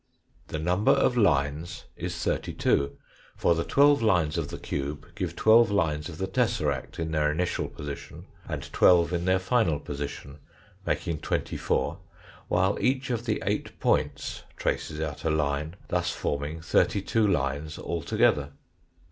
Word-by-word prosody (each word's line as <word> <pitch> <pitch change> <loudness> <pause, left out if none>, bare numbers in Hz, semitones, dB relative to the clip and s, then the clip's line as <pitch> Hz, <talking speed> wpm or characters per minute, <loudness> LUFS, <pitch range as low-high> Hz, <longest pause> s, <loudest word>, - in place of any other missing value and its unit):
The - - -4
number 90 +6 +3
of 125 - +2
lines 80 - +1
is - - -4
thirty - - -2
two, 70 0 +1 0.4
for 85 - +3
the 85 0 -1
twelve 145 +4 +4
lines 90 -9 +2
of - - -1
the - - -6
cube 70 +2 -4
give - - -4
twelve 115 +1 +6
lines 80 -6 0
of 80 - -8
the 95 - -1
tesseract 75 - -1
in 80 -1 -3
their 75 -1 +2
initial 90 +4 -1
position, 70 -1 -8 0.2
and - - -4
twelve 85 -1 +5
in 85 0 -1
their 95 0 +4
final 95 - +1
position, 70 0 -6 0.5
making 80 -3 -1
twenty - - -2
four, - - -1 0.5
while 95 +2 +1
each 130 0 +1
of 120 0 -2
the 110 - -1
eight - - -2
points - - 0 0.2
traces 75 -1 -2
out 75 -2 -4
a 80 - +1
line, 75 +1 -1
thus 90 0 0
forming 75 0 -3
thirty 95 +4 +2
two 110 +1 +2
lines 75 -3 -1
altogether. 75 -3 +1
80 Hz, 155 wpm, -27 LUFS, 75-95 Hz, 0.5 s, twelve